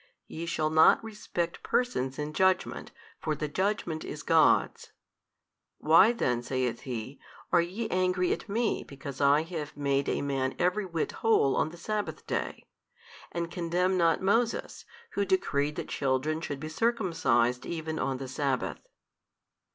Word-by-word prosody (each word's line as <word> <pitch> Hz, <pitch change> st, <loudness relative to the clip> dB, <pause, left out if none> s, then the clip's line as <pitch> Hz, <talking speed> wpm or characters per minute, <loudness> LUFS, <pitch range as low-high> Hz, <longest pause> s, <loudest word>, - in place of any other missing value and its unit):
Ye 165 Hz, +1 st, -6 dB
shall 155 Hz, -2 st, 0 dB
not 160 Hz, +7 st, +6 dB
respect 210 Hz, -6 st, -4 dB
persons 135 Hz, -, -1 dB
in 150 Hz, +1 st, -4 dB
judgment, 190 Hz, +2 st, +1 dB, 0.3 s
for 155 Hz, -1 st, -1 dB
the 150 Hz, +1 st, -3 dB
judgment 180 Hz, -1 st, -1 dB
is 150 Hz, -, -7 dB
God's. 160 Hz, -2 st, +3 dB, 0.8 s
why 165 Hz, +8 st, +6 dB
then 125 Hz, -, 0 dB
(saith 125 Hz, -1 st, -2 dB
He) 125 Hz, +3 st, -5 dB, 0.3 s
are 175 Hz, -, +5 dB
ye 195 Hz, +7 st, -3 dB
angry 185 Hz, 0 st, +2 dB
at -, -, -7 dB
Me 225 Hz, +3 st, 0 dB
because 140 Hz, 0 st, -8 dB
I 145 Hz, +2 st, +5 dB
have 160 Hz, -4 st, -6 dB
made 140 Hz, -1 st, 0 dB
a -, -, -1 dB
man 135 Hz, -2 st, -1 dB
every 185 Hz, +3 st, +1 dB
whit 165 Hz, -3 st, -2 dB
whole 220 Hz, -12 st, +3 dB
on -, -, +1 dB
the 170 Hz, -, -12 dB
sabbath 210 Hz, +4 st, -4 dB
day, -, -, -3 dB, 0.7 s
and 170 Hz, 0 st, -3 dB
condemn 180 Hz, +2 st, 0 dB
not 170 Hz, 0 st, +2 dB
Moses 230 Hz, +4 st, 0 dB, 0.3 s
who 200 Hz, -, 0 dB
decreed 150 Hz, -7 st, 0 dB
that -, -, -5 dB
children 140 Hz, +3 st, 0 dB
should 145 Hz, -3 st, -4 dB
be 155 Hz, -, -5 dB
circumcised 160 Hz, -, +1 dB
even 160 Hz, -2 st, -4 dB
on 135 Hz, -1 st, -1 dB
the 135 Hz, 0 st, -6 dB
sabbath. 135 Hz, 0 st, -2 dB
160 Hz, 150 wpm, -29 LUFS, 140-185 Hz, 0.8 s, not